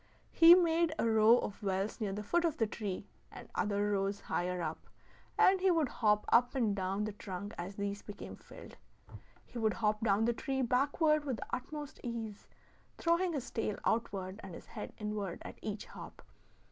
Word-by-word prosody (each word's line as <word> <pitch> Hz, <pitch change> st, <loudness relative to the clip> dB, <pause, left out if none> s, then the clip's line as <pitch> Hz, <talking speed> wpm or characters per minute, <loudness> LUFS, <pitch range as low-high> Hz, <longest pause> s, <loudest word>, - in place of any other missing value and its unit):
He 335 Hz, +1 st, +9 dB
made 335 Hz, -2 st, +3 dB
a -, -, +1 dB
row 220 Hz, +1 st, +6 dB
of 205 Hz, -3 st, -4 dB
wells 195 Hz, +3 st, -2 dB
near 205 Hz, -2 st, -1 dB
the 205 Hz, +2 st, -4 dB
foot 340 Hz, +12 st, +1 dB
of 330 Hz, -4 st, 0 dB
the 225 Hz, -, +2 dB
tree, 205 Hz, -3 st, -4 dB, 0.3 s
and -, -, -10 dB
other 205 Hz, 0 st, 0 dB
rows 200 Hz, 0 st, 0 dB
higher 180 Hz, +1 st, -2 dB
up, 160 Hz, -2 st, -4 dB, 0.5 s
and 380 Hz, 0 st, +5 dB
he 380 Hz, -, +4 dB
would 325 Hz, -7 st, +2 dB
hop 210 Hz, -3 st, +2 dB
up 245 Hz, +3 st, +4 dB
and 225 Hz, -6 st, +1 dB
down 195 Hz, +1 st, -1 dB
the 215 Hz, -, -2 dB
trunk 200 Hz, 0 st, -7 dB
as 180 Hz, +3 st, -6 dB
these 200 Hz, 0 st, -3 dB
became 205 Hz, -1 st, -8 dB
filled. -, -, -13 dB, 0.7 s
He 240 Hz, -, -7 dB
would 220 Hz, -2 st, +1 dB
hop 215 Hz, 0 st, 0 dB
down 210 Hz, 0 st, +3 dB
the 235 Hz, -, +2 dB
tree 265 Hz, +2 st, -2 dB
backward 285 Hz, +5 st, +2 dB
with 265 Hz, -5 st, -2 dB
the -, -, -6 dB
utmost 295 Hz, +3 st, -7 dB
ease, 225 Hz, -4 st, -5 dB, 0.5 s
throwing 340 Hz, +1 st, +1 dB
his 275 Hz, -5 st, -4 dB
tail 215 Hz, -2 st, -2 dB
outward 200 Hz, -4 st, -1 dB
and 190 Hz, -3 st, -8 dB
his -, -, -11 dB
head 215 Hz, -, -7 dB
inward 210 Hz, -4 st, -3 dB
at -, -, -9 dB
each 210 Hz, -1 st, -4 dB
hop. -, -, -11 dB
215 Hz, 185 wpm, -33 LUFS, 200-265 Hz, 0.7 s, He